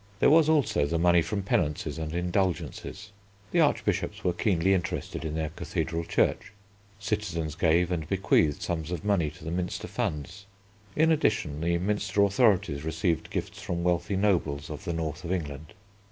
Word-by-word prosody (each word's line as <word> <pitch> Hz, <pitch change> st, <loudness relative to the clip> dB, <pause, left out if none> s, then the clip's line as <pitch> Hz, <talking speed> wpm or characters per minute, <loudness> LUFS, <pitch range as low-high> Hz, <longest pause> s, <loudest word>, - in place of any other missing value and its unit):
There -, -, +5 dB
was, 160 Hz, 0 st, +6 dB
also, 140 Hz, -, +2 dB
the 85 Hz, -, 0 dB
money 85 Hz, 0 st, +4 dB
from 95 Hz, +5 st, -2 dB
penances 80 Hz, -3 st, -1 dB
and 80 Hz, -1 st, -4 dB
indulgences. 90 Hz, +4 st, -2 dB, 0.4 s
The 175 Hz, -, +2 dB
Archbishops 155 Hz, -3 st, +1 dB
were 90 Hz, -, +1 dB
keenly 95 Hz, 0 st, +2 dB
interested 90 Hz, -2 st, -2 dB
in 80 Hz, -1 st, -3 dB
their 80 Hz, -1 st, -1 dB
cathedral 85 Hz, 0 st, -3 dB
church. -, -, 0 dB, 0.4 s
Citizens 95 Hz, -7 st, -2 dB
gave 85 Hz, +2 st, +2 dB
and 80 Hz, -3 st, -2 dB
bequeathed 90 Hz, -6 st, +2 dB
sums 80 Hz, -2 st, -3 dB
of 90 Hz, +2 st, -4 dB
money 95 Hz, -7 st, +2 dB
to 75 Hz, -, -14 dB
the 80 Hz, -, -4 dB
Minster 90 Hz, +1 st, -3 dB
funds. 90 Hz, +7 st, -4 dB, 0.5 s
In 160 Hz, +1 st, +4 dB
addition, 85 Hz, -, +1 dB
the 85 Hz, +1 st, +1 dB
Minster 100 Hz, +2 st, +1 dB
authorities 100 Hz, -, +2 dB
received 80 Hz, +1 st, -1 dB
gifts -, -, -4 dB
from 85 Hz, -1 st, -3 dB
wealthy 90 Hz, +3 st, +1 dB
nobles 85 Hz, -8 st, 0 dB
of -, -, -7 dB
the 85 Hz, -, -2 dB
north 80 Hz, +1 st, -3 dB
of 85 Hz, -, -4 dB
England. 75 Hz, -2 st, -4 dB
85 Hz, 165 wpm, -28 LUFS, 80-100 Hz, 0.5 s, was